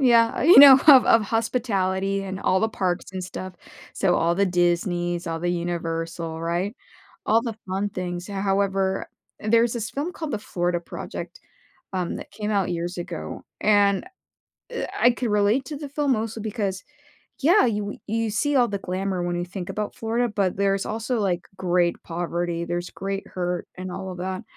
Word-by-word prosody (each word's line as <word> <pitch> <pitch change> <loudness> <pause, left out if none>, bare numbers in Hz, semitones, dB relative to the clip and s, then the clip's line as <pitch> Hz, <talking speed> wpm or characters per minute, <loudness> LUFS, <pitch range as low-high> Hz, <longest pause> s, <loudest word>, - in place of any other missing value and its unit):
yeah, 235 -4 +4
you 325 +1 +8
know, 275 -1 +12
of 270 -4 +9
of 225 - +5
hospitality 195 -4 0
and 190 -1 -5
all 190 - +2
the 220 - +2
parks 185 -4 -2
and 185 -1 -4
stuff. 185 0 -7 0.4
So, 180 -3 +2
all 170 +1 +2
the 200 +2 +2
Disney's, 175 0 0
all 165 -1 -3
the 175 - -1
Universal, 165 -1 -3
right? 175 +5 -1 0.5
All 225 +2 +4
the 230 -3 -4
fun 195 +2 -1
things, 180 -1 -5
h 200 - -6
however, 195 -1 0 0.3
there's 230 +2 +3
this 225 -2 -3
film 295 +6 -3
called 315 -4 -5
The - - -1
Florida 175 -4 -1
Project, 170 - -8 0.5
um, 180 -2 -2
that - - -9
came 210 -1 -4
out 200 -4 +1
years 175 +1 -3
ago, 175 -1 -6 0.2
and, 200 -2 +3 0.7
eh, 475 - -3
I 245 - +6
can 245 0 -2
relate 210 +5 +2
to 300 - -5
the 290 0 -6
film 285 0 0
mostly 225 -1 -2
because 205 -4 -3 0.6
yeah, 320 +2 +5
you 210 -3 0
w 205 0 -6
you 225 +1 -1
see 280 +7 +1
all 245 -2 +4
the 200 - -3
glamour 185 0 -2
when 175 0 -1
you 175 - -2
think 180 0 -7
about 210 -1 -4
Florida, 230 +2 0
but 200 -4 0
there's 195 0 +1
also, 225 +3 -2
like, 180 -3 -1
great 175 -1 +1
poverty, 170 0 -3
there's 175 +1 -3
great 195 0 -4
hurt 180 -1 -3
and 185 0 -6
all 190 0 -5
of 180 - -7
that. 185 +2 -4
195 Hz, 185 wpm, -24 LUFS, 175-225 Hz, 0.7 s, know